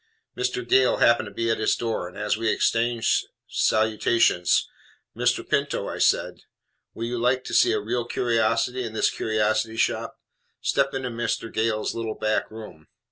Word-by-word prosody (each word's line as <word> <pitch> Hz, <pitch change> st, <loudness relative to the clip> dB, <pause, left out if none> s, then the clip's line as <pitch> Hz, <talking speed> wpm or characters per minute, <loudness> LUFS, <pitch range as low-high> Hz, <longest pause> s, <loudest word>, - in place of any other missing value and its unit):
Mr. 125 Hz, -1 st, -2 dB
Gale 130 Hz, +1 st, +4 dB
happened 120 Hz, -2 st, +3 dB
to -, -, -9 dB
be 115 Hz, +3 st, -1 dB
at 115 Hz, -, -1 dB
his 110 Hz, -, +2 dB
door, 115 Hz, -6 st, -3 dB
and 90 Hz, -, -12 dB
as 105 Hz, 0 st, 0 dB
we 110 Hz, 0 st, -1 dB
exchanged 115 Hz, 0 st, +1 dB, 0.2 s
salutations, 110 Hz, -4 st, +2 dB, 0.5 s
"Mr. -, -, 0 dB
Pinto," -, -, -1 dB
I -, -, -5 dB
said, -, -, +1 dB, 0.6 s
"will 115 Hz, -, -4 dB
you 120 Hz, 0 st, -3 dB
like 125 Hz, +2 st, +1 dB
to -, -, -7 dB
see 365 Hz, -, +5 dB
a 430 Hz, -, +1 dB
real 120 Hz, -, -2 dB
curiosity 115 Hz, +1 st, 0 dB
in 115 Hz, -2 st, -6 dB
this 110 Hz, -, +1 dB
curiosity 110 Hz, +1 st, 0 dB
shop? -, -, -1 dB, 0.4 s
Step 140 Hz, -1 st, 0 dB
into 130 Hz, -1 st, -3 dB
Mr. 115 Hz, -1 st, -3 dB
Gale's 110 Hz, -1 st, 0 dB
little 115 Hz, -1 st, -4 dB
back 110 Hz, 0 st, -1 dB
room." 105 Hz, -8 st, -11 dB
115 Hz, 165 wpm, -24 LUFS, 110-120 Hz, 0.6 s, see